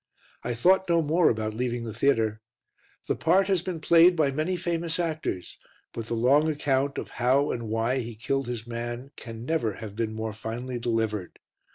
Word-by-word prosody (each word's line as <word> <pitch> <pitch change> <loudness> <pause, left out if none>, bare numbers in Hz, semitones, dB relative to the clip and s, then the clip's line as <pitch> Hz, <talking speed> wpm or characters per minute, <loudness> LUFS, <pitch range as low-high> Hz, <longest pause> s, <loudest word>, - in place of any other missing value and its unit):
I 120 0 -3
thought 190 +9 +3
no 170 -1 +3
more 160 +3 +3
about 110 -1 -1
leaving 120 +1 -2
the 115 -2 -5
theatre. 110 -3 +1 0.6
The - - 0
part 185 +4 +3
has 190 -3 +2
been 180 -2 -4
played 170 +3 +6
by 150 -4 +2
many 155 +6 -1
famous 170 -1 -1
actors, 155 - -3 0.3
but 115 -1 -5
the 115 - -2
long 140 +7 +4
account 140 -2 0
of - - -5
how 135 +4 +3
and 115 -2 -4
why 115 +4 0
he 120 -2 -5
killed 135 +3 -2
his 120 -2 -4
man 120 +3 -5
can 115 -1 -8
never 130 -9 0
have 105 -1 -8
been 110 -1 -2
more 110 0 -3
finely 120 +3 -5
delivered. 110 -5 -2
125 Hz, 185 wpm, -27 LUFS, 115-160 Hz, 0.6 s, played